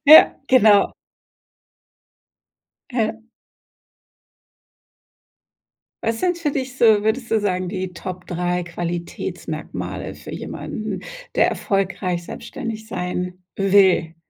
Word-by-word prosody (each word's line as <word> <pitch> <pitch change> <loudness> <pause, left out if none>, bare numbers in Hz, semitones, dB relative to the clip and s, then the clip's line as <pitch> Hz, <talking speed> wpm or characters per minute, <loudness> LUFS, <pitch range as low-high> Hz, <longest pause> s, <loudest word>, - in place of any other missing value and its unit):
Ja, 310 +2 +10
genau. 215 -6 +6 2.0
Ja. 225 -3 +1 2.9
Was 225 0 0
sind 355 +3 +1
für 320 -3 0
dich 260 -2 -4
so, 220 -3 +6
würdest 230 +2 0
du 225 - +4
sagen, 185 -3 0
die 185 -1 -3
Top 180 +1 -7
3 180 0 -1
Qualitätsmerkmale 175 0 -5
für - - -10
jemanden, - - -5 0.3
der - - +4
erfolgreich 190 -3 -1
selbstständig 220 +2 -6
sein 180 -2 -3
will? 190 -4 +4
195 Hz, 90 wpm, -22 LUFS, 180-225 Hz, 2.9 s, Ja